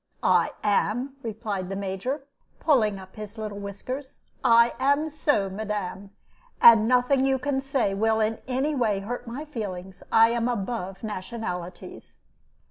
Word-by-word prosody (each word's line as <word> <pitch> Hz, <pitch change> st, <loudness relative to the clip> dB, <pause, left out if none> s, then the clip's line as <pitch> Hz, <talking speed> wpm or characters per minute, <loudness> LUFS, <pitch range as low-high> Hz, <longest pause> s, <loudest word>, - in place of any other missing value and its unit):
"I -, -, +3 dB
am," 220 Hz, +6 st, +1 dB
replied 215 Hz, -5 st, -4 dB
the 195 Hz, -, -3 dB
Major, 200 Hz, +9 st, -3 dB, 0.4 s
pulling 220 Hz, -10 st, +3 dB
up 190 Hz, 0 st, -12 dB
his 210 Hz, +1 st, -8 dB
little 210 Hz, -2 st, -5 dB
whiskers; 255 Hz, +8 st, -6 dB, 0.2 s
"I 235 Hz, 0 st, +6 dB
am 285 Hz, +4 st, +2 dB
so, 290 Hz, -9 st, +1 dB
madam, 200 Hz, -1 st, -4 dB, 0.5 s
and 225 Hz, -2 st, +8 dB
nothing 250 Hz, +2 st, +3 dB
you 270 Hz, 0 st, +2 dB
can 270 Hz, +1 st, -1 dB
say 270 Hz, -7 st, 0 dB
will 220 Hz, +2 st, +2 dB
in 220 Hz, +1 st, 0 dB
any 265 Hz, +4 st, 0 dB
way 220 Hz, -7 st, +1 dB
hurt 240 Hz, +4 st, -5 dB
my 260 Hz, +6 st, -5 dB
feelings. 190 Hz, -9 st, -6 dB
I 225 Hz, 0 st, +6 dB
am 235 Hz, 0 st, 0 dB
above 195 Hz, -4 st, -3 dB
nationalities." 185 Hz, -3 st, -6 dB
225 Hz, 140 wpm, -26 LUFS, 200-255 Hz, 0.5 s, and